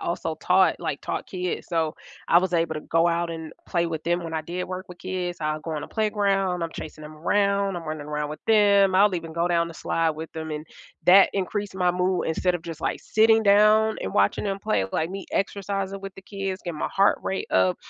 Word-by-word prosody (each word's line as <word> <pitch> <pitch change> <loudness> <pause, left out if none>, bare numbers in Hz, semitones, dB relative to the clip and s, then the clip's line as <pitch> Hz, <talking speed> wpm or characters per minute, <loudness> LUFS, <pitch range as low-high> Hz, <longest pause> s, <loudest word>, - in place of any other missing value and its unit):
also 165 -2 -3
taught 185 +3 +3
like, 155 -4 -3
taught - - -4
kids, 180 -1 -4
so, 165 -2 -1 0.3
I 170 - +7
was 185 0 -1
able 165 -1 +1
to - - -4
go 165 +1 +2
out 170 0 0
and 160 -1 -6
play 170 -1 0
with 160 -2 -4
them 175 +1 0
when 165 - -6
I 160 - -1
did 175 +3 -4
work 185 0 -6
with 180 - -11
kids, 185 -1 -4
I'll 155 0 -1
go 160 +1 -5
on 150 - -3
a - - -8
playground, 200 -4 0
I'm 165 - -2
chasing 155 0 -8
'em 155 0 -10
around, 200 +3 +1
I'm 175 - -5
running 155 -2 -5
around 150 0 -3
with 155 - -6
them, 200 -3 +5
I'll 200 +2 +5
even 165 -1 -6
go 170 +1 0
down 170 -1 +2
the 165 - -9
slide 165 +1 0
with 160 +1 -7
them, 160 -1 -5
and 150 +1 -5 0.4
that 190 +2 +8
increased 200 +1 -3
my 180 -1 +2
mood 180 +1 0
instead 180 +3 +1
of 175 - -4
just, 165 -1 -7
like, - - -2
sitting 220 0 +4
down 215 +2 +5
and 95 - -4
watching 100 - +2
'em 195 -1 -2
play, 100 - +1
like, 160 +2 -1
me 195 +1 -6
exercising 195 0 -2
with 195 -1 -8
the 195 - -12
kids, 195 0 -5
getting 170 -4 -5
my - - -1
heart 195 +1 +4
rate 190 - -3
up, 95 -1 +3
175 Hz, 235 wpm, -25 LUFS, 160-195 Hz, 0.4 s, that